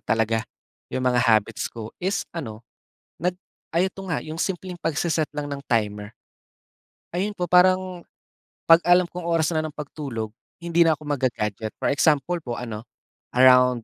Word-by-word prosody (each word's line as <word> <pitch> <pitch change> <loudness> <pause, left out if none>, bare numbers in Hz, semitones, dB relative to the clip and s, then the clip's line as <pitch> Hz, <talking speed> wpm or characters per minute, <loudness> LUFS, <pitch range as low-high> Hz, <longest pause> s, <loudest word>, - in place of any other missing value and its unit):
talaga 115 0 +1 0.5
yung 130 - -3
mga 125 -1 +3
habits 110 -3 +2
ko 110 -1 -8
is 190 +2 -1
ano, 115 -9 -7 0.6
nag 180 +1 0 0.4
ay 175 +3 +3
ito 195 - -10
nga, 170 -4 -1
yung 155 +1 -7
simpleng 185 -1 -3
pagse-set 160 0 0
lang 150 0 -3
ng 140 0 -5
timer. 105 -2 -1 1.0
Ayun 200 +4 -2
po, 180 -1 -2
parang 185 0 +4 0.6
kapag 165 +1 +6
alam 180 +1 +6
kong 175 0 -7
oras 165 -1 +2
na 160 - +1
ng 155 -1 -6
pagtulog, 135 -7 -5 0.3
hindi 170 0 +4
na 160 - +4
ako 150 - -15
magga-gadget. 115 -6 -2
For - - +1
example 150 +4 +2
po 120 -7 -5
ano, 115 -1 -6 0.5
around 125 -1 +6
150 Hz, 155 wpm, -24 LUFS, 120-175 Hz, 1.0 s, kapag